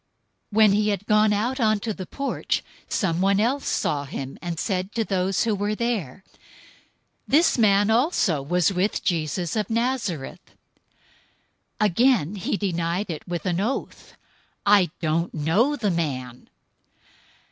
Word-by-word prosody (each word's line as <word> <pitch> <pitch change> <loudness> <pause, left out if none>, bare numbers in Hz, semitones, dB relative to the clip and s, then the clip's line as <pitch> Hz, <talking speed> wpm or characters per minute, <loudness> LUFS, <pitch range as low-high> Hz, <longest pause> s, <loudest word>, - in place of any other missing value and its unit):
026:071 210 - -5
When 215 -2 +7
he 210 +1 +2
had 200 -1 -2
gone 210 0 +4
out 235 +6 -1
onto 215 -1 +1
the 185 -2 -8
porch, 275 0 -2 0.3
someone 190 +2 +1
else 260 +6 0
saw 145 -1 0
him, 135 -1 -7
and 170 -2 -4
said 190 -1 -2
to 230 - +1
those 190 -1 0
who 225 -2 +1
were 205 +1 -1
there, 205 - -3 1.0
"This 320 +5 +4
man 205 -1 +4
also 225 - +2
was 175 +6 +1
with 190 +3 0
Jesus 170 0 -1
of 215 0 -1
Nazareth." 230 - -3 1.2
026:072 215 - +3
Again 210 - +2
he 190 - -2
denied 175 0 -2
it 155 - -7
with 175 -2 -4
an 180 -1 0
oath, 240 +6 -4 0.5
"I 200 -4 +5
don't 165 +1 -1
know 185 - +2
the 215 -8 -1
man." 130 -7 -4
200 Hz, 140 wpm, -24 LUFS, 170-220 Hz, 1.2 s, When